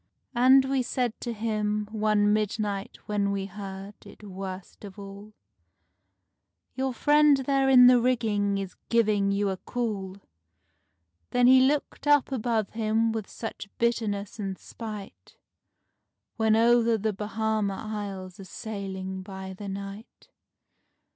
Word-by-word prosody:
And 260 +2 +6
we 265 -1 +1
said 245 -1 -1
to 240 - -3
him 210 -1 -1
one 210 -1 +2
midnight 210 -1 -2
when 205 -1 0
we 195 -1 -2
heard 195 0 -8
it - - -15
worst 190 -1 -8
of 200 -1 -10
all, 200 +1 -10 1.4
"Your 265 +1 -1
friend 295 +3 +4
there 270 0 +2
in 250 -2 +8
the 250 -1 +7
rigging 215 -5 +1
is 195 -2 -5
giving 210 -4 +2
you 200 0 +1
a 190 - -4
call." 200 -5 -4 1.1
Then 245 0 +3
he 260 +1 +7
looked 285 +2 0
up 290 -2 +4
above 230 -4 -1
him 225 0 +1
with 220 -2 -4
such 220 -3 -7
bitterness 220 -3 -1
and 195 -2 -3
spite, 215 -3 -9 1.0
When 220 -1 +3
over 230 0 +4
the 215 0 -1
Bahama 215 0 -1
Isles 200 -4 -6
a 195 - -9
sailing 190 -2 -6
by 190 0 -8
the 200 +1 -7
night. 200 +3 -8
215 Hz, 130 wpm, -27 LUFS, 200-235 Hz, 1.4 s, in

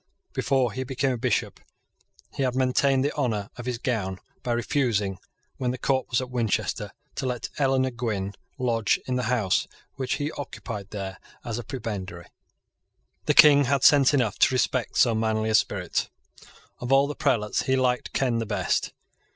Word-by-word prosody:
Before 130 -4 +1
he 130 +4 -3
became 135 +1 -1
a 125 - -2
Bishop, - - -1 0.7
he - - -4
had 130 -2 0
maintained 130 +1 +2
the 145 - 0
honour 110 -8 -2
of 125 0 -8
his 125 -2 -1
gown 110 -7 -2 0.2
by 125 - -3
refusing, 115 -6 0 0.4
when 125 - -1
the 125 - -2
court 130 0 0
was 120 - +2
at 130 -1 -5
Winchester, 115 -5 -1 0.2
to 130 - -3
let 125 0 -3
Eleanor 130 -2 +2
Gwynn 105 -5 -3 0.2
lodge 115 -5 +1
in 130 - -2
the 125 - 0
house 110 -7 +1 0.3
which 130 -2 -1
he 145 +1 -2
occupied 115 -7 -7
there 95 -3 -6 0.3
as 115 0 -3
a - - -5
prebendary. 100 -8 -6 1.0
The - - +3
King 145 -2 +8
had 135 0 +1
sense 140 -3 +7
enough 125 -8 +1
to 130 - +4
respect 130 -1 0
so 120 - +5
manly 110 0 0
a - - 0
spirit. - - +1 0.7
Of 125 +1 -4
all 135 +1 +6
the 145 - -3
prelates 105 -7 0
he 130 - +3
liked 125 -1 0
Ken 125 -4 +1
the 115 - -3
best. 105 - -1
125 Hz, 175 wpm, -26 LUFS, 110-130 Hz, 1.0 s, King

